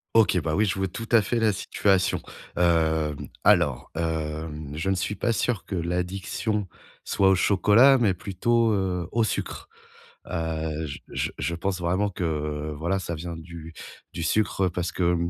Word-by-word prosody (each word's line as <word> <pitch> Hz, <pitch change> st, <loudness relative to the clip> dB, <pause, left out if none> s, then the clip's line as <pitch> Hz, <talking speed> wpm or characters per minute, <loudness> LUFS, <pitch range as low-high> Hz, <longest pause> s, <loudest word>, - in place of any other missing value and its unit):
OK, 105 Hz, -5 st, +5 dB
bah 80 Hz, -1 st, -1 dB
oui, 105 Hz, +2 st, +3 dB
je 100 Hz, -, 0 dB
vois 95 Hz, 0 st, 0 dB
tout 115 Hz, +5 st, -7 dB
à 115 Hz, -2 st, +7 dB
fait 120 Hz, +4 st, -1 dB
la 110 Hz, -2 st, +3 dB
situation. 95 Hz, -1 st, +1 dB, 0.4 s
Hem, 80 Hz, -3 st, +1 dB, 0.2 s
alors, 70 Hz, -8 st, +3 dB
hem, 80 Hz, -2 st, -3 dB
je 90 Hz, +5 st, -2 dB
ne 95 Hz, -, +2 dB
suis 95 Hz, +3 st, -2 dB
pas 115 Hz, +5 st, 0 dB
sûr 115 Hz, -3 st, -1 dB
que -, -, -4 dB
l'addiction 90 Hz, +4 st, -2 dB, 0.4 s
soit 95 Hz, -1 st, +3 dB
au 95 Hz, -, +5 dB
chocolat, 105 Hz, +8 st, +5 dB
mais 100 Hz, -6 st, +2 dB
plutôt, 115 Hz, +5 st, +1 dB
heu, 90 Hz, -3 st, -1 dB
au 115 Hz, +1 st, +2 dB
sucre. 110 Hz, -, -3 dB, 0.6 s
Heu, 80 Hz, -1 st, -2 dB
j 70 Hz, -, -7 dB
je -, -, -2 dB
je 85 Hz, -, -2 dB
pense 95 Hz, +2 st, -2 dB
vraiment 95 Hz, +4 st, +1 dB
que 75 Hz, -4 st, -3 dB
voilà, 85 Hz, +5 st, 0 dB
ça 85 Hz, -, -4 dB
vient 85 Hz, +1 st, -6 dB
du 80 Hz, 0 st, -9 dB, 0.4 s
du 85 Hz, -, -4 dB
sucre, 95 Hz, +1 st, +1 dB
parce 90 Hz, +1 st, -3 dB
que, 90 Hz, -, -2 dB
mmh, 85 Hz, 0 st, 0 dB
90 Hz, 175 wpm, -26 LUFS, 80-100 Hz, 0.6 s, à